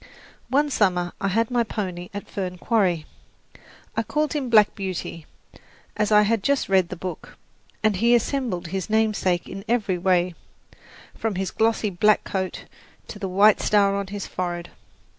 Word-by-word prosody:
One 290 Hz, +2 st, +2 dB
summer 180 Hz, -6 st, +1 dB
I 195 Hz, -, +1 dB
had 225 Hz, +5 st, +1 dB
my 240 Hz, -1 st, +2 dB
pony 185 Hz, -5 st, -5 dB
at 205 Hz, 0 st, -7 dB
Fern 185 Hz, -2 st, -4 dB
Quarry. 180 Hz, -7 st, +1 dB, 0.9 s
I -, -, +1 dB
called 300 Hz, +7 st, -1 dB
him 280 Hz, -5 st, -2 dB
Black 215 Hz, -3 st, +5 dB
Beauty, 185 Hz, -5 st, -5 dB, 0.7 s
as 210 Hz, 0 st, 0 dB
I 210 Hz, 0 st, +7 dB
had 220 Hz, 0 st, +1 dB
just 280 Hz, +5 st, +1 dB
read 190 Hz, -3 st, +3 dB
the -, -, -5 dB
book, 180 Hz, -1 st, -7 dB, 0.5 s
and 215 Hz, -3 st, +2 dB
he 235 Hz, +5 st, +3 dB
resembled 235 Hz, -, 0 dB
his 190 Hz, +2 st, -3 dB
namesake 215 Hz, -5 st, +1 dB
in 195 Hz, 0 st, -7 dB
every 210 Hz, -6 st, 0 dB
way, 180 Hz, -1 st, +2 dB, 0.8 s
from 225 Hz, -3 st, -3 dB
his 190 Hz, 0 st, -2 dB
glossy 220 Hz, -2 st, +1 dB
black 210 Hz, +4 st, +3 dB
coat 190 Hz, -1 st, -4 dB, 0.4 s
to 205 Hz, -, -8 dB
the 195 Hz, -2 st, -3 dB
white 200 Hz, +3 st, +5 dB
star 200 Hz, -1 st, +3 dB
on 200 Hz, -1 st, -2 dB
his 200 Hz, 0 st, -5 dB
forehead. 175 Hz, -1 st, -4 dB
200 Hz, 160 wpm, -24 LUFS, 185-220 Hz, 0.9 s, I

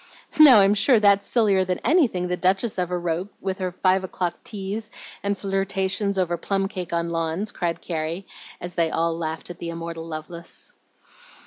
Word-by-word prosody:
"Now, 265 Hz, -9 st, +10 dB
I'm 195 Hz, +1 st, +5 dB
sure 225 Hz, +3 st, +4 dB
that's 200 Hz, -1 st, +4 dB
sillier 205 Hz, -5 st, +3 dB
than 180 Hz, -1 st, -1 dB
anything 250 Hz, -, +3 dB
the 180 Hz, -, -1 dB
Duchess 190 Hz, +3 st, +1 dB
ever 180 Hz, 0 st, -1 dB
wrote 175 Hz, +3 st, -2 dB
with 190 Hz, 0 st, -3 dB
her 185 Hz, -1 st, -2 dB
five 185 Hz, +1 st, +2 dB
o'clock 180 Hz, -1 st, -3 dB
teas 210 Hz, +1 st, -5 dB, 0.3 s
and 200 Hz, 0 st, -1 dB
flirtations 195 Hz, +1 st, -1 dB
over 175 Hz, -2 st, 0 dB
plum 195 Hz, +3 st, -1 dB
cake 185 Hz, -3 st, -6 dB
on 170 Hz, 0 st, -1 dB
lawns," 165 Hz, +5 st, -1 dB
cried 170 Hz, -4 st, -3 dB
Carrie, 165 Hz, +3 st, -3 dB, 0.3 s
as 175 Hz, 0 st, -5 dB
they 165 Hz, -1 st, +1 dB
all 165 Hz, +1 st, 0 dB
laughed 160 Hz, +1 st, -4 dB
at 175 Hz, -, -11 dB
the 170 Hz, -, -5 dB
immortal 165 Hz, 0 st, -6 dB
Lovelace. 165 Hz, +2 st, -8 dB
185 Hz, 175 wpm, -24 LUFS, 170-200 Hz, 0.3 s, Now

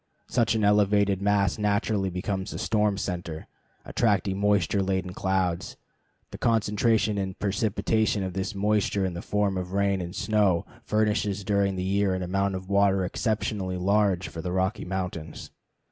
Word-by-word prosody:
Such 115 Hz, -1 st, +1 dB
an 110 Hz, -, 0 dB
elevated 100 Hz, -1 st, +3 dB
mass 100 Hz, -1 st, +2 dB
naturally 105 Hz, -1 st, +1 dB
becomes 95 Hz, +1 st, -3 dB
a -, -, -5 dB
storm 105 Hz, -2 st, +1 dB
center, 85 Hz, -4 st, -4 dB, 0.4 s
attracting 100 Hz, -4 st, +1 dB
moisture 100 Hz, -2 st, +2 dB
laden 95 Hz, -1 st, -1 dB
clouds. 95 Hz, -3 st, -1 dB, 0.5 s
The -, -, -8 dB
concentration 110 Hz, -1 st, +2 dB
and 95 Hz, -1 st, -4 dB
precipitation 105 Hz, 0 st, 0 dB
of 95 Hz, -1 st, -4 dB
this 95 Hz, +3 st, -3 dB
moisture 100 Hz, -1 st, +1 dB
in 90 Hz, -, -2 dB
the 85 Hz, -, -5 dB
form 100 Hz, -2 st, 0 dB
of 90 Hz, 0 st, -6 dB
rain 100 Hz, -1 st, +1 dB
and 90 Hz, +2 st, -6 dB
snow 105 Hz, -5 st, +2 dB, 0.2 s
furnishes 105 Hz, -2 st, 0 dB
during 100 Hz, -1 st, +1 dB
the 90 Hz, -, -3 dB
year 95 Hz, 0 st, +1 dB
an 95 Hz, -, -3 dB
amount 95 Hz, +2 st, 0 dB
of 95 Hz, 0 st, -6 dB
water 100 Hz, -1 st, +3 dB
exceptionally 100 Hz, -2 st, -2 dB
large 100 Hz, -1 st, +2 dB
for 80 Hz, -, -7 dB
the 90 Hz, +2 st, -4 dB
Rocky 95 Hz, +2 st, -1 dB
Mountains. 90 Hz, -4 st, -5 dB
100 Hz, 155 wpm, -26 LUFS, 95-105 Hz, 0.5 s, elevated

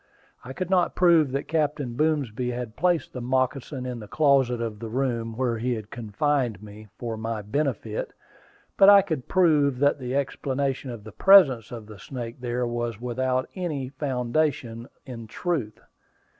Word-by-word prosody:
I 130 Hz, -, -8 dB
could 185 Hz, +4 st, -4 dB
not 180 Hz, -2 st, +2 dB
prove 170 Hz, -6 st, +4 dB
that 140 Hz, -, -2 dB
Captain 150 Hz, -5 st, -1 dB
Boomsby 135 Hz, -5 st, 0 dB
had 120 Hz, -2 st, -5 dB
placed 175 Hz, -2 st, 0 dB
the 125 Hz, -, -5 dB
moccasin 130 Hz, +1 st, -1 dB
in 125 Hz, -2 st, -4 dB
the 105 Hz, -, -9 dB
closet 135 Hz, -3 st, +2 dB
of 115 Hz, -3 st, -4 dB
the 115 Hz, 0 st, -6 dB
room 115 Hz, -2 st, -2 dB
where 120 Hz, -3 st, 0 dB
he 125 Hz, +1 st, 0 dB
had 110 Hz, -2 st, -8 dB
confined 120 Hz, -1 st, -1 dB
me, 105 Hz, +1 st, -11 dB
for 115 Hz, -2 st, -4 dB
my 110 Hz, -1 st, -4 dB
benefit, 115 Hz, -2 st, -2 dB, 0.7 s
but 195 Hz, -, +8 dB
I 200 Hz, -1 st, +8 dB
could 160 Hz, -9 st, -4 dB
prove 150 Hz, -7 st, +3 dB
that 145 Hz, +2 st, +2 dB
the 125 Hz, 0 st, -4 dB
explanation 135 Hz, -1 st, -2 dB
of 115 Hz, -4 st, -7 dB
the 110 Hz, -, -10 dB
presence 140 Hz, -, +5 dB
of 115 Hz, -3 st, -7 dB
the 105 Hz, -1 st, -12 dB
snake 120 Hz, -2 st, -7 dB
there 125 Hz, 0 st, -1 dB
was 120 Hz, -2 st, -3 dB
without 130 Hz, +1 st, -1 dB
any 155 Hz, -8 st, -3 dB
foundation 130 Hz, -3 st, -2 dB, 0.2 s
in 115 Hz, -4 st, -8 dB
truth. 140 Hz, -6 st, -3 dB
125 Hz, 165 wpm, -25 LUFS, 115-145 Hz, 0.7 s, but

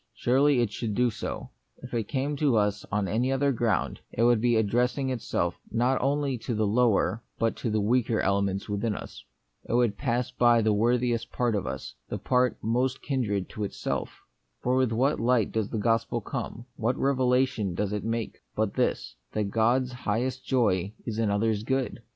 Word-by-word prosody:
Surely 135 Hz, +1 st, +3 dB
it 115 Hz, -4 st, 0 dB
should 110 Hz, -1 st, -3 dB
do 125 Hz, -1 st, +3 dB
so. 105 Hz, -, -6 dB, 0.3 s
If 125 Hz, -, -9 dB
it 115 Hz, -3 st, -1 dB
came 140 Hz, +2 st, -1 dB
to 140 Hz, -5 st, +3 dB
us 105 Hz, -1 st, 0 dB
on 100 Hz, -1 st, 0 dB
any 120 Hz, +6 st, 0 dB
other 140 Hz, +1 st, +2 dB
ground, 115 Hz, -3 st, 0 dB
it 115 Hz, -, 0 dB
would 120 Hz, -2 st, +4 dB
be 120 Hz, 0 st, +3 dB
addressing 125 Hz, +5 st, +1 dB
it 125 Hz, -3 st, -2 dB
self -, -, -1 dB
not 125 Hz, +3 st, +1 dB
only 140 Hz, -2 st, 0 dB
to 115 Hz, +1 st, -3 dB
lower 110 Hz, +1 st, +2 dB, 0.2 s
but 115 Hz, -1 st, +1 dB
to 110 Hz, -2 st, -1 dB
weaker 115 Hz, +1 st, +2 dB
elements 100 Hz, 0 st, 0 dB
within 105 Hz, +1 st, -1 dB
us. -, -, -9 dB, 0.4 s
It -, -, -4 dB
would 120 Hz, -4 st, +2 dB
pass 120 Hz, -2 st, 0 dB
by 120 Hz, -2 st, +4 dB
the 110 Hz, -1 st, +3 dB
worthiest 120 Hz, +2 st, +1 dB
part 120 Hz, -2 st, 0 dB
of 100 Hz, -9 st, -1 dB
us, 65 Hz, +1 st, -5 dB, 0.2 s
the -, -, -2 dB
part 125 Hz, -1 st, +1 dB
most 125 Hz, +4 st, 0 dB
kindred 110 Hz, -9 st, -1 dB
to 105 Hz, -, -5 dB
itself. 100 Hz, -, -4 dB, 0.4 s
For 125 Hz, +1 st, +2 dB
with 130 Hz, -3 st, +2 dB
what 130 Hz, +6 st, +1 dB
light 115 Hz, -2 st, +2 dB
does 110 Hz, -2 st, -1 dB
the 115 Hz, -, -3 dB
gospel 115 Hz, +2 st, +1 dB
come, 115 Hz, +2 st, -5 dB
what 120 Hz, +2 st, 0 dB
revelation 130 Hz, -7 st, +1 dB
does 105 Hz, +2 st, -1 dB
it 105 Hz, -2 st, -2 dB
make, 115 Hz, 0 st, -3 dB, 0.2 s
but 110 Hz, -2 st, 0 dB
this, -, -, -1 dB, 0.2 s
that 105 Hz, -2 st, -1 dB
God's 120 Hz, +4 st, +2 dB
highest 125 Hz, +2 st, -2 dB
joy 105 Hz, -7 st, +1 dB
is 115 Hz, -2 st, -3 dB
in 110 Hz, -2 st, +2 dB
others' 105 Hz, +1 st, +1 dB
good 130 Hz, +1 st, -2 dB
115 Hz, 185 wpm, -27 LUFS, 105-125 Hz, 0.4 s, would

